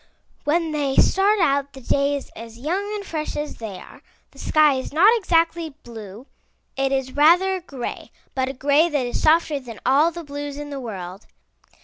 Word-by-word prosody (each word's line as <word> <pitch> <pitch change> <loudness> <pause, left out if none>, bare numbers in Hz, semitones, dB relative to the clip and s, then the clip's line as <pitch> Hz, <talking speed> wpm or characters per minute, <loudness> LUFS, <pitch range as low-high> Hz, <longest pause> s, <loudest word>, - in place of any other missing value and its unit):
When 325 +2 +1
they 285 -3 -1
start 400 +2 +4
out 280 -4 +1
the 265 - -10
day 280 +3 +1
is 280 - -7
as 230 0 -10
young 365 - -2
and 405 -1 -6
fresh 310 -5 -4
as 295 0 -4
they 215 -5 -7
are. - - -14 0.3
The - - -18
sky 305 -2 +4
is 260 -1 -4
not 390 +10 +6
exactly 335 -6 +1
blue; 220 0 -10 0.5
it 270 0 0
is 265 -1 -1
rather 345 +6 +5
a - - -9
gray, 270 -8 -7 0.2
but 260 -1 -1
a - - -4
gray 285 +5 +3
that 290 -5 0
is 245 - -3
softer 310 -2 +3
than 240 -4 -10
all 280 +6 +4
the 340 0 -8
blues 290 -1 -6
in 295 0 -7
the 280 - -5
world. 195 -5 -7
285 Hz, 195 wpm, -22 LUFS, 260-330 Hz, 0.5 s, not